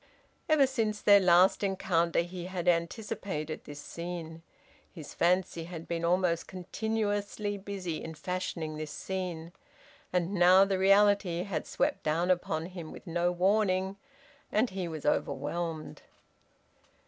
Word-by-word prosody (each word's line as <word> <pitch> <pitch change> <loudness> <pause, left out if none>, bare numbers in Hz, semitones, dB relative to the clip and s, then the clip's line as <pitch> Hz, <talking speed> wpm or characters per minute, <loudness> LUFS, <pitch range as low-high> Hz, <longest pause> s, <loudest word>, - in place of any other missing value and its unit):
Ever 305 -3 +6
since 225 -5 -1
their 205 -1 +7
last 180 +1 +5
encounter 175 -4 +1
he 175 0 -6
had 185 -2 -4
anticipated 170 -2 -1
this 145 0 -9
scene; 170 0 -6 0.5
his 160 -5 -10
fancy 175 -1 +1
had 165 -1 -8
been 170 -1 -3
almost 170 -1 +1
continuously 205 +1 -2
busy 195 -4 -5
in 160 0 -7
fashioning 170 -3 -4
this 155 -1 -5
scene. 175 -1 -5 0.6
And 180 +1 0
now 185 +1 +6
the 195 -1 -1
reality 195 -2 +4
had 175 -6 -4
swept 290 +1 0
down 165 +4 +1
upon 165 -3 -1
him 175 -3 -8
with - - -11
no 175 0 0
warning, 190 +1 +1 0.6
and 220 +2 +2
he 185 -2 -3
was 160 -3 -6
overwhelmed. 155 +3 -2
180 Hz, 130 wpm, -30 LUFS, 170-195 Hz, 0.6 s, their